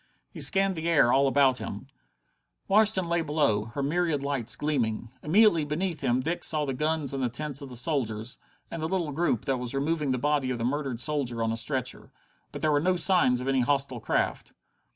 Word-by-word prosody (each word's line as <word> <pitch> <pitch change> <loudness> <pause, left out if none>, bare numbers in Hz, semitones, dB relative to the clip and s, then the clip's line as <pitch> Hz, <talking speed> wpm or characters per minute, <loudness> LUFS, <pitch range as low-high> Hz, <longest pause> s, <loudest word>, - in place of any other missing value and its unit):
He - - -7
scanned 195 -1 +3
the 165 +1 -3
air 145 -7 +4
all 140 +1 +4
about 135 -2 +3
him. 105 +6 -7 0.8
Washington 200 -3 +4
lay 170 0 0
below, 145 -10 0
her 120 +5 -5
myriad 155 -1 0
lights 140 -5 0
gleaming. 120 -7 -2
Immediately 170 0 +4
beneath 165 +2 -3
him 125 -1 +1
Dick 165 +6 -3
saw 155 -2 +3
the 135 - -3
guns 150 0 -2
and 135 - -3
the 125 - 0
tents 145 +3 -4
of 140 - -8
the 125 - -8
soldiers, 120 -4 -2 0.3
and 165 - -5
the 160 - -1
little 175 -5 -1
group 145 -6 -1
that 135 -1 0
was 125 +1 -5
removing 150 +1 -1
the 130 - 0
body 145 0 0
of 125 - -2
the 115 - -4
murdered 135 -2 -2
soldier 130 -5 -1
on 115 - 0
a - - -1
stretcher. 130 +2 -3 0.4
But - - -8
there 155 - +2
were 145 - +3
no 185 +3 +1
signs 165 -9 +3
of 130 - -5
any 135 -1 +2
hostile 135 -1 0
craft. - - -2
140 Hz, 210 wpm, -27 LUFS, 125-160 Hz, 0.8 s, air